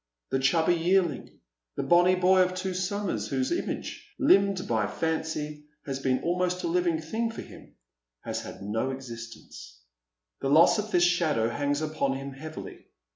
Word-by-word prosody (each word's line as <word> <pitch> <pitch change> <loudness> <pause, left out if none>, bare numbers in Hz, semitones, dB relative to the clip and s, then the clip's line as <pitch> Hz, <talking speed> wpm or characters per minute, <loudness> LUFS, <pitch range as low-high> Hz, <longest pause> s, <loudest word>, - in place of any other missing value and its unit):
The 135 - +1
chubby 160 +5 +3
yearling, 175 -3 +1 0.5
the - - -2
bonny 175 +1 +5
boy 185 +1 +4
of 185 0 +1
two 185 +1 -2
suiunicrs, 190 +2 -2
whose 260 +3 -1
image, 345 - -4
limned 200 -8 +3
by 110 -3 +1
fancy, 155 -2 -3 0.2
has 135 -1 -3
been 130 -1 0
almost 180 +1 0
a - - 0
livi 175 0 +1
ng 160 - -2
thing 225 +8 -2
for 225 - -7
him, - - -15 0.5
has - - -4
had - - -9
no 110 +6 -1
existence. 115 - -9 0.6
The 135 - -2
loss 160 +8 +6
of 210 +1 -3
this 175 -4 +3
shadow 160 -10 +2
hangs 145 +4 -1
upon 155 -3 -1
him 135 +1 -6
heavily. 155 +4 -9
160 Hz, 165 wpm, -27 LUFS, 135-185 Hz, 0.6 s, loss